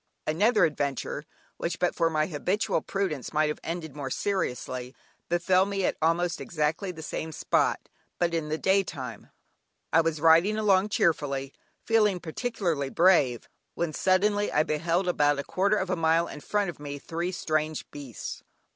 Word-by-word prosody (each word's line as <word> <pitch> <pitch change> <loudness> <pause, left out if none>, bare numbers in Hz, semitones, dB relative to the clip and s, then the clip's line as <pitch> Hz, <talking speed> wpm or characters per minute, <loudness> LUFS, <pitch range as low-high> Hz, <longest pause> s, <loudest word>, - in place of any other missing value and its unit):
Another 210 +9 +3
adventure 145 -3 -2 0.3
(which 170 0 -3
but 180 - +1
for 165 -1 +2
my 155 -1 +1
habitual 180 +6 -1
prudence 185 -10 -3
might 155 0 +2
have 150 - -4
ended 165 -4 -5
more 140 -3 -4
seriously) 130 -8 -2 0.3
befell 185 +2 +3
me 195 -2 -1
at - - +1
almost 165 +2 +1
exactly 165 +4 -1
the 160 -2 -9
same 160 +1 -4
spot, - - 0 0.3
but 170 -1 0
in 160 -2 -1
the 155 - -1
day 190 +4 +3
time. 130 - -7 0.6
I 165 - +6
was 165 -1 -1
riding 165 +7 +5
along 205 -2 +3
cheerfully, 140 -8 0 0.3
feeling 210 -5 +3
particularly 170 - -2
brave, 145 -8 +3 0.3
when 170 -2 -2
suddenly 205 +4 +2
I 150 - +3
beheld 165 +4 0
about 145 -4 +3
a 140 - -2
quarter 200 +6 +1
of 190 -1 -2
a - - +2
mile 165 0 +2
in - - -8
front 205 0 0
of 160 - -19
me 145 -1 -6
three 170 +5 -3
strange 155 -3 -1
beasts. 140 -6 -7
165 Hz, 165 wpm, -27 LUFS, 150-185 Hz, 0.6 s, I